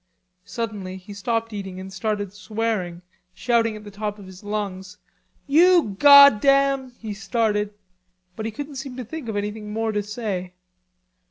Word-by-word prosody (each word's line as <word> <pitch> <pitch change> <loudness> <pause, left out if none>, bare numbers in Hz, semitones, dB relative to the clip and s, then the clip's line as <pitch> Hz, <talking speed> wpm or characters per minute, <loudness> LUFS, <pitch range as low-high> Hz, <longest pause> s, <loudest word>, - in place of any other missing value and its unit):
Suddenly 205 -5 -5
he 195 +2 -11
stopped 225 +2 -2
eating 190 -2 -6
and 190 0 -9
started 205 0 -2
swearing, 205 -5 -3 0.3
shouting 230 +1 +1
at 210 - -10
the 205 - -10
top 210 +1 -4
of 200 - -12
his 185 +1 -13
lungs: 195 -3 -4 0.5
"You 325 - +4
goddam..." 275 -1 +6
he 220 -2 -6
started, 210 -1 -1 0.6
but 220 +2 -4
he - - -4
couldn't 285 +4 -7
seem 265 -1 -7
to 250 - -5
think 290 0 -7
of 220 - -3
anything 210 +1 -4
more 225 +1 -1
to 210 -1 -1
say. 205 -4 -4
215 Hz, 155 wpm, -23 LUFS, 200-235 Hz, 0.6 s, goddam